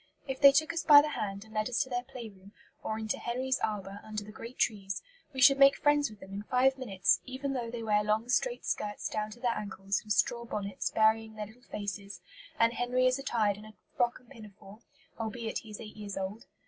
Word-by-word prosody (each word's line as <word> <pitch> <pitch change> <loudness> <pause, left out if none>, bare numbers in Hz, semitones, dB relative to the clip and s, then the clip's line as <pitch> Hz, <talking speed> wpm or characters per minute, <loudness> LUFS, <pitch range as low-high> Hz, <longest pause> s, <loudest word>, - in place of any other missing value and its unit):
If 265 0 -4
they 280 -1 +10
took 310 +4 +2
us 335 - -1
by 290 -2 +9
the 305 - -2
hand 200 -7 -4
and 220 - -16
led 215 +2 0
us 245 - 0
to 260 - -13
their 245 0 0
playroom, 220 -7 -11 0.3
or 220 - -3
into 220 -1 -2
"Henry's 260 +2 -1
arbour" 200 -2 -3
under 215 -1 -5
the 210 - -11
great 230 +3 -10
trees, 195 -3 -1 0.3
we 265 - -6
should 275 0 +7
make 275 0 +7
friends 290 -1 +3
with 215 -1 -14
them 195 0 -11
in 200 - -4
five 255 +4 +3
minutes, 200 -9 +1
even 270 +2 -4
though 240 -3 -3
they 235 -1 -5
wear 210 -1 +2
long 215 +2 0
straight 485 - 0
skirts 205 0 -2
down 215 0 -2
to 220 +3 -12
their 240 -1 +1
ankles 195 -1 -2
and 215 - -9
straw 235 +2 +2
bonnets 200 -4 -3
burying 220 0 +2
their 210 -1 -4
little 220 +4 -16
faces, 205 -2 -6 0.4
and 230 0 +4
Henry 250 +1 +1
is 255 +1 +3
attired 220 -7 +1
in 210 - -11
a 215 0 -13 0.2
frock 240 0 +1
and 250 0 -24
pinafore, 210 -3 -13 0.4
albeit 225 0 -3
he 220 - -14
is 210 - -8
eight 215 -2 -9
years 205 -2 -6
old. 195 +6 -5
220 Hz, 225 wpm, -31 LUFS, 210-255 Hz, 0.4 s, they